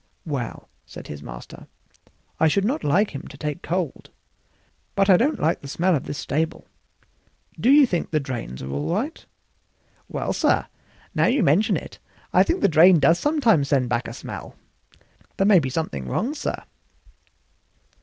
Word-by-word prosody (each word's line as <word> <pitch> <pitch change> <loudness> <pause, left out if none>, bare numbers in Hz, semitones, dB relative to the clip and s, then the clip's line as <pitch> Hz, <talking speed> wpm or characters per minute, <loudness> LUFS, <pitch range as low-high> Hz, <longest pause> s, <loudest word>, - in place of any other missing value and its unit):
"Well," 140 -7 -5 0.2
said - - -11
his 75 -1 -7
master, - - -10 0.7
"I 160 - +4
should 195 +5 +1
not 265 +7 -1
like 185 +9 +2
him 140 - -7
to 145 - -12
take 150 +3 -4
cold; 175 -4 -3 0.9
but 195 0 +4
I - - +8
don't 270 - +1
like 165 +2 0
the 140 - -9
smell 175 +5 +1
of 135 - -3
this 145 - -5
stable. 160 +2 -2 0.9
Do 245 - +2
you 285 +1 +7
think 180 -9 -2
the 155 - +1
drains 120 - -6
are 65 - -6
all 70 - -2
right?" 255 - -2 0.8
"Well, - - -3
sir, - - +2 0.5
now - - +2
you 255 -1 +2
mention 170 +8 +3
it, - - -9 0.3
I - - +6
think 345 +3 +1
the - - +5
drain 170 +2 +6
does 165 +4 +4
sometimes 240 - +2
send 130 -4 +1
back 120 0 -1
a - - -7
smell; - - -8 0.8
there 195 - +2
may 200 -3 +6
be 135 -4 -2
something 100 - -3
wrong, 245 - -1
sir." 295 - -4
165 Hz, 170 wpm, -23 LUFS, 140-205 Hz, 0.9 s, I